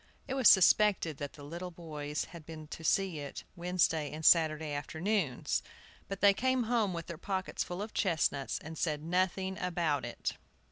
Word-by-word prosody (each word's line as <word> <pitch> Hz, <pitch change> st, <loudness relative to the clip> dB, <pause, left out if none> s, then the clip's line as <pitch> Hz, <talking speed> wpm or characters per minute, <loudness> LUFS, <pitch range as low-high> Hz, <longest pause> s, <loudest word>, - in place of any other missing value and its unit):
It 265 Hz, -, -3 dB
was 265 Hz, -4 st, +6 dB
suspected 190 Hz, -4 st, +5 dB
that 145 Hz, -1 st, -5 dB
the 145 Hz, -, -12 dB
little 170 Hz, +5 st, -6 dB
boys 150 Hz, -4 st, -5 dB
had 170 Hz, -2 st, -11 dB
been 155 Hz, 0 st, -9 dB
to 160 Hz, -, -8 dB
see 185 Hz, -1 st, +1 dB
it 145 Hz, -1 st, -7 dB
Wednesday 170 Hz, -4 st, +1 dB
and 155 Hz, +1 st, -6 dB
Saturday 155 Hz, -2 st, +4 dB
afternoons. 160 Hz, -, -1 dB, 0.5 s
But 195 Hz, -1 st, -6 dB
they 200 Hz, -1 st, +7 dB
came 260 Hz, +4 st, +1 dB
home 225 Hz, -3 st, +1 dB
with 170 Hz, -2 st, -5 dB
their 170 Hz, -3 st, -8 dB
pockets 190 Hz, -2 st, -2 dB
full 180 Hz, +3 st, -5 dB
of 215 Hz, -, -8 dB
chestnuts, 155 Hz, -6 st, 0 dB
and 160 Hz, +1 st, -8 dB
said 150 Hz, -3 st, -1 dB
nothing 185 Hz, +2 st, 0 dB
about 170 Hz, -6 st, 0 dB
it. -, -, -4 dB
170 Hz, 175 wpm, -32 LUFS, 155-190 Hz, 0.5 s, they